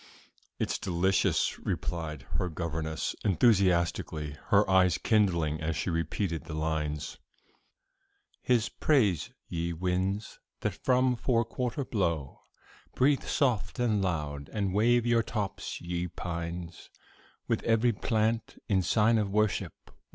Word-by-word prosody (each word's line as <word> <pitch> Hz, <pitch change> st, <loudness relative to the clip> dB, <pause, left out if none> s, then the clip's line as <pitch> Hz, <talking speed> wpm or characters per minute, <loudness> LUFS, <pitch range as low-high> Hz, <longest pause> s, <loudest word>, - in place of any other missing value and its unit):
"It -, -, -1 dB
is -, -, -2 dB
delicious," 95 Hz, +1 st, +1 dB
replied 80 Hz, -6 st, -3 dB, 0.2 s
her 90 Hz, -, 0 dB
governess, 80 Hz, -1 st, -3 dB
enthusiastically, 85 Hz, -7 st, +2 dB
her 105 Hz, +1 st, +4 dB
eyes 95 Hz, -3 st, +4 dB
kindling 85 Hz, -8 st, +1 dB
as 80 Hz, 0 st, -1 dB
she 90 Hz, -, -1 dB
repeated 85 Hz, +1 st, -2 dB
the 75 Hz, -, -6 dB
lines: 75 Hz, -2 st, -2 dB, 1.2 s
"'His 120 Hz, -3 st, +2 dB
praise, 105 Hz, -, +2 dB, 0.2 s
ye 85 Hz, 0 st, -2 dB
winds, 95 Hz, +4 st, -2 dB, 0.2 s
that -, -, -1 dB
from 125 Hz, 0 st, +2 dB
four 115 Hz, -1 st, +1 dB
quarter 125 Hz, +3 st, -3 dB
blow, 85 Hz, -, -2 dB, 0.5 s
Breathe 140 Hz, +2 st, +3 dB
soft 125 Hz, -6 st, 0 dB
and 115 Hz, -5 st, +1 dB
loud; 75 Hz, -6 st, -2 dB
and 100 Hz, -3 st, -1 dB
wave 120 Hz, +3 st, +3 dB
your 120 Hz, -1 st, +3 dB
tops, 105 Hz, -3 st, -4 dB
ye 85 Hz, 0 st, -3 dB
pines, 85 Hz, 0 st, -6 dB, 0.6 s
With -, -, 0 dB
every 115 Hz, +1 st, +2 dB
plant, 110 Hz, +1 st, -1 dB
in 95 Hz, -3 st, +2 dB
sign 110 Hz, +5 st, +3 dB
of 105 Hz, -2 st, 0 dB
worship. 105 Hz, 0 st, -1 dB
95 Hz, 120 wpm, -29 LUFS, 85-110 Hz, 1.2 s, her